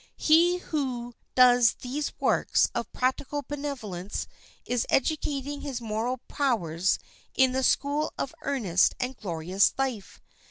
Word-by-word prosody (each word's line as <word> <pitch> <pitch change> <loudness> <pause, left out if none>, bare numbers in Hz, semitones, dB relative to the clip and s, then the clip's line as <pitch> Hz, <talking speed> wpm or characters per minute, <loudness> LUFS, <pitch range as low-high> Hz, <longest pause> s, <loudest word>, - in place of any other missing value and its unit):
He 340 +3 +4
who 255 -8 -3 0.2
does 245 -3 +6
these 280 +4 -4
works - - +2
of - - -3
practical 265 +3 -1
benevolence 250 -10 -5 0.4
is 245 -2 -1
educating 285 0 0
his 275 -4 -4
moral 230 +3 -2
powers 190 - 0 0.4
in 260 -1 +4
the 260 +1 0
school 290 +3 +1
of 275 - -3
earnest 210 -11 +2
and 255 +1 -2
glorious 180 -1 +1
life. 260 -7 -3
255 Hz, 120 wpm, -27 LUFS, 220-285 Hz, 0.4 s, does